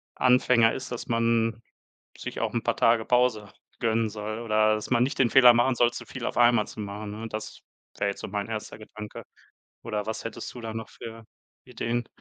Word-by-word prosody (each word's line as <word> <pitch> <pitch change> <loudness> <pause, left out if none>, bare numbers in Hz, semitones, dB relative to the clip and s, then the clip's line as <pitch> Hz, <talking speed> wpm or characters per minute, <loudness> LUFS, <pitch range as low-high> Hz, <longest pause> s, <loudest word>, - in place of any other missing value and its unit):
Anfänger 125 -2 +4
ist, 130 -1 -6
dass 120 - -5
man 115 -1 +1 0.6
sich - - -6
auch - - -1
'n - - 0
paar - - 0
Tage 115 -1 +3
Pause 125 -4 +2 0.3
gönnen 115 -1 +1
soll 105 +1 -5
oder 110 -1 +3
dass 110 - -6
man 120 -2 +3
nicht 130 - -1
den 125 -3 +3
Fehler 125 -2 +8
machen 120 +2 +3
soll, 120 0 +3
zu - - -8
viel 130 -3 -7
auf - - -3
einmal 120 -3 +5
zu - - -9
machen, 105 +1 -6
ne? 110 +2 -6
Das 110 0 -7 0.4
wär' 100 - +1
jetzt 100 - -4
so - - -6
mein 100 +1 -3
erster 110 -1 -5
Gedanke. 105 0 -9 0.6
Oder 105 -3 -3
was 110 0 -4
hättest 115 - -6
du 125 - -9
da 110 -1 -5
noch 110 0 -6
für 115 0 -10 0.4
Ideen? 120 -1 -3
115 Hz, 205 wpm, -27 LUFS, 110-120 Hz, 0.6 s, Fehler